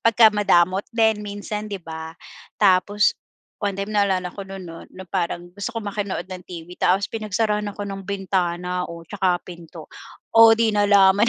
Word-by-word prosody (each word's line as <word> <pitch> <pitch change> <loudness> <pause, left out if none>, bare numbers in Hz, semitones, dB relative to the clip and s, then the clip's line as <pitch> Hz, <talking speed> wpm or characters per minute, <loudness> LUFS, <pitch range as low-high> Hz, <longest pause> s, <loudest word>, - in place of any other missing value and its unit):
pagkamadamot 205 -5 +4
din 220 -2 +2
minsan, 210 +1 -5
'di 200 - -4
ba? 160 0 -7 0.4
Tapos 205 +1 +3 0.5
one 200 -2 -1
time 200 +2 -4
naalala 190 -3 +1
ko - - -9
no'n 195 -1 -8
'no, 165 -1 -10
na 190 0 -9
parang 175 -1 -3
gusto 205 +4 -6
ko - - +1
makinood 200 -3 -3
ng 185 -1 -8
TV 170 -1 -8
tapos 190 +3 +2
pinagsarahan 210 -1 -1
ako 205 - -5
ng 195 -1 -6
bintana 180 -2 -1
o 170 0 -9
tsaka 185 -1 0
pinto, 170 -2 -11 0.5
o 225 - +6 0.2
'di 225 -2 +2
nalaman 205 +1 +5
195 Hz, 160 wpm, -22 LUFS, 180-210 Hz, 0.5 s, o